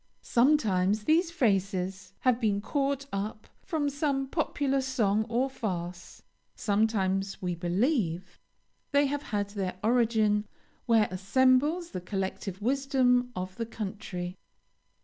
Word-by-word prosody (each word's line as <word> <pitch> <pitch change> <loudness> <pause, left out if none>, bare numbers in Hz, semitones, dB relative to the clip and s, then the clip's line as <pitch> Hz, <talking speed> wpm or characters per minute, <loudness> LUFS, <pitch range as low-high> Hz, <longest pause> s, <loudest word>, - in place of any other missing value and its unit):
Sometimes 215 -7 +3
these 330 - +3
phrases 195 - -1
have 250 -1 +2
been 205 -3 +2
caught 275 +4 -1
up 210 +2 -4
from 315 -5 -1
some 280 -1 0
popular 275 -2 0
song 220 -5 +1
or 245 +3 +1
farce; 180 -8 -5 0.3
sometimes, 200 -2 0
we 180 -1 -2
believe, 180 - -1 0.5
they 285 +1 +4
have 285 +1 -1
had 205 -6 -3
their 190 -3 -3
origin 220 -3 +2 0.4
"where 225 -3 +4
assembles 260 - +2
the 185 - -4
collective 190 +1 -4
wisdom 255 -1 +2
of 185 0 -5
the 230 - -2
country." 195 -5 -5
220 Hz, 115 wpm, -29 LUFS, 195-270 Hz, 0.5 s, they